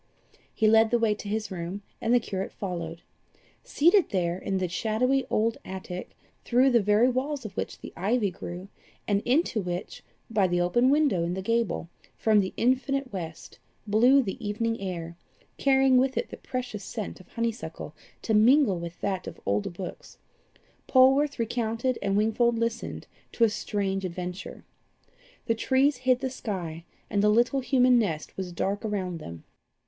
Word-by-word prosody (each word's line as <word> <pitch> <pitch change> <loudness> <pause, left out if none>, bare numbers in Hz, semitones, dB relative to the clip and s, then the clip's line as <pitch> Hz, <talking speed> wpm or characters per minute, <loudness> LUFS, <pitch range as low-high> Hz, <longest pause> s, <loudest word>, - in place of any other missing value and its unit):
He 220 - +1
led 220 +1 +5
the 240 - +3
way 225 -2 +2
to 210 - -8
his 215 -1 -2
room, 185 +3 -5 0.2
and 230 - 0
the 245 - +6
curate 195 -4 -4
followed. 170 -4 -5 0.6
Seated 345 +5 +3
there, 175 -3 0
in 190 +1 -2
the 185 -1 0
shadowy 235 +8 0
old 225 +1 +1
attic, 185 -1 -7 0.3
through 255 +2 +3
the 235 -2 +4
very 210 +4 +4
walls 260 +1 -2
of 195 -3 -7
which - - -4
the - - -10
ivy 205 +3 +1
grew, 175 +2 -7 0.4
and 200 -1 +2
into 250 -3 +2
which, 180 +1 -5 0.3
by 205 -4 +2
the 175 0 0
open 240 +9 +3
window 280 - +3
in 175 +1 -2
the 190 - -3
gable, 230 -5 0 0.3
from 215 -2 +4
the 190 -2 0
infinite 260 +1 0
west, 165 -4 -7 0.3
blew 245 +6 +5
the 195 -1 -5
evening 225 +1 -2
air, 170 -3 -5 0.4
carrying 270 -1 +4
with 265 +1 +1
it - - -1
the - - -8
precious 250 -5 -5
scent 215 0 -6
of 185 - -16
honeysuckle, 230 0 -4 0.3
to 220 - 0
mingle 220 - +5
with 170 0 -7
that 190 -2 -2
of - - -8
old 100 +6 0
books, 175 +1 -8 0.7
Polwarth 270 +3 +4
recounted 230 +2 -1
and 195 0 +1
Wingfold 230 +2 +2
listened 230 0 -3 0.3
to 235 - +1
a 230 - +6
strange 200 -2 -2
adventure. 180 +1 -6 0.8
The 230 - +2
trees 265 +4 +2
hid 255 0 +2
the 260 -2 -2
sky, 175 -9 -5 0.2
and 200 - 0
the 210 - +4
little 240 +5 +3
human 250 -1 +4
nest 165 -9 -2
was 185 -2 -5
dark 200 +5 -2
around 190 -5 -3
them. 85 - -9
215 Hz, 165 wpm, -27 LUFS, 185-250 Hz, 0.8 s, the